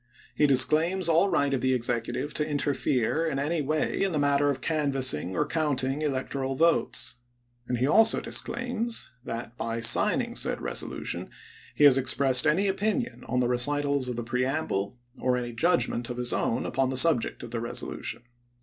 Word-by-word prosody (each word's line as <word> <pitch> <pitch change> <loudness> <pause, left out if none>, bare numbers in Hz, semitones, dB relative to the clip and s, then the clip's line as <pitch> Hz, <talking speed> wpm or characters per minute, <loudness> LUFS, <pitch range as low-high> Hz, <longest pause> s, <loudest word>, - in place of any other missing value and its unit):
He 150 +4 +2
disclaims 155 +7 +3
all 170 +4 +3
right 140 -5 0
of 130 - -1
the 130 0 +1
Executive 120 +4 -3
to 150 - 0
interfere 145 -1 -1
in 140 - -2
any 150 +4 -1
way 155 +2 -1
in 195 -2 0
the - - -1
matter 145 0 +2
of 135 -2 -2
canvassing 135 - 0
or - - 0
counting 145 -3 -1
electoral 135 -2 -3
Message, - - -11
votes; - - -3 0.5
and 125 - -2
he 125 - 0
also 220 +9 +4
disclaims 235 -1 -1
that, 115 -2 -7
by 115 0 -3
signing 235 - +3
said - - +1
resolu - - -14
Feb - - -1
ms!865' - - -9
tion, - - -4 0.5
he - - +1
has 135 -2 +7
expressed 130 +1 +4
any 180 +7 +2
opinion 215 +5 -2
on 125 +1 0
the 125 - +1
recitals 140 +2 0
of 125 - -4
the 120 - -4
^eS^iks 115 - -14
preamble, 125 -4 -2 0.3
or 125 -1 +1
any 120 -1 -4
judgment 120 -4 0
of 125 - -5
his 125 0 0
own - - -1
upon 135 -1 -1
the 130 - -1
subject 130 -3 +3
p - - -11
fii. - - -5
of 120 - -12
the 115 - -3
resolution. 120 0 -5
135 Hz, 195 wpm, -26 LUFS, 125-155 Hz, 0.5 s, has